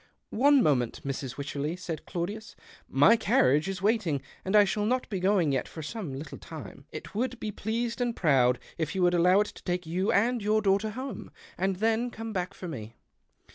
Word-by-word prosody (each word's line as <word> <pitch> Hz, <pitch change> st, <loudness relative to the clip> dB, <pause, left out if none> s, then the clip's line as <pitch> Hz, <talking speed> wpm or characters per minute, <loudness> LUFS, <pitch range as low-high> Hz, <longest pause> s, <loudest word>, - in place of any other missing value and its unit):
" -, -, -52 dB, 0.2 s
One 285 Hz, -3 st, +7 dB
moment, 125 Hz, -, +1 dB
Mrs. 135 Hz, -2 st, -4 dB
Wycherley," 145 Hz, +3 st, -3 dB
said 175 Hz, -4 st, -6 dB
Claudius. 205 Hz, +6 st, -4 dB, 0.4 s
''My 145 Hz, -, +6 dB
carriage 145 Hz, +3 st, +3 dB
is 190 Hz, 0 st, -5 dB
waiting, 205 Hz, -9 st, +2 dB, 0.2 s
and 190 Hz, +3 st, 0 dB
I 210 Hz, -, +8 dB
shall 205 Hz, +1 st, 0 dB
not 255 Hz, +2 st, 0 dB
be 195 Hz, -, -1 dB
going 185 Hz, -5 st, +2 dB
yet 135 Hz, -2 st, -1 dB
for 160 Hz, -, -8 dB
some 195 Hz, -1 st, -5 dB
little 145 Hz, +2 st, -7 dB
time. 150 Hz, -3 st, -10 dB
It -, -, -8 dB
would 245 Hz, +3 st, -2 dB
be 215 Hz, -, -3 dB
pleased 230 Hz, +4 st, -2 dB
and 240 Hz, -1 st, 0 dB
proud 130 Hz, -6 st, +3 dB, 0.2 s
if 160 Hz, 0 st, -2 dB
you 185 Hz, -, +1 dB
would 175 Hz, 0 st, +4 dB
allow 180 Hz, +3 st, +5 dB
it 210 Hz, -, 0 dB
to -, -, -14 dB
take 180 Hz, -1 st, -2 dB
you 180 Hz, +5 st, 0 dB
and 235 Hz, +3 st, +2 dB
your 215 Hz, +1 st, +2 dB
daughter 200 Hz, +2 st, +2 dB
home, 255 Hz, 0 st, -6 dB, 0.3 s
and 190 Hz, +1 st, 0 dB
then 225 Hz, +4 st, +1 dB
come 225 Hz, -2 st, -7 dB
])ack 180 Hz, 0 st, -2 dB
for 185 Hz, -, -7 dB
me." 115 Hz, -8 st, -7 dB
190 Hz, 205 wpm, -28 LUFS, 155-220 Hz, 0.4 s, I